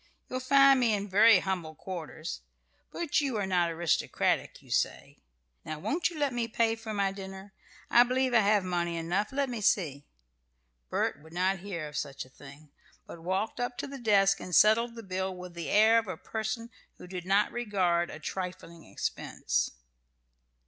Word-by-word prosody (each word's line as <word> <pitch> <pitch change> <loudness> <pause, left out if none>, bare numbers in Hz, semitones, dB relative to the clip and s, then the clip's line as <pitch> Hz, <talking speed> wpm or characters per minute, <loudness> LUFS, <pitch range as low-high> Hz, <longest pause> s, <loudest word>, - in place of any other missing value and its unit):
You'll 255 - -3
find 275 +1 +6
me 235 -4 +3
in 200 0 -4
very 205 0 +6
humble 175 -5 -3
quarters; 165 -1 -6 0.5
but 335 -2 0
you 270 -6 -1
are 205 - 0
not 180 -2 +1
aristocratic, 165 0 0
you - - -17
say. - - -1 0.4
Now 155 - -5
won't 315 - 0
you 340 - -9
let 285 -3 0
me 240 -1 -1
pay 230 0 +1
for 225 -1 -7
my 200 -2 0
dinner? 195 0 -9 0.3
I 240 - +6
believe 255 +1 +2
I 235 - +6
have 205 -1 +3
money 175 -2 -1
enough. 175 +5 -1
Let 275 0 0
me 240 -4 -4
see." 150 -9 +1 0.8
Bert 145 - -1
would 160 +1 -16
not 190 +2 +1
hear 175 -5 -5
of 150 0 -7
such 140 -2 -4
a - - -18
thing, 145 +2 -15 0.3
but 170 - -10
walked 190 +7 -2
up 245 0 -2
to - - -3
the 275 -1 -8
desk 200 -4 +3
and 180 - -3
settled 230 +3 +5
the 230 - -8
bill 190 -1 -3
with 180 -1 -9
the 170 -2 -5
air 220 +2 +6
of 225 - -6
a 185 - -5
person 220 +2 -4 0.3
who - - -11
did 180 -1 -7
not 200 +2 +3
regard 185 -7 0
a - - -7
trifling 180 -3 -6
expense. - - -2
195 Hz, 185 wpm, -29 LUFS, 175-230 Hz, 0.8 s, find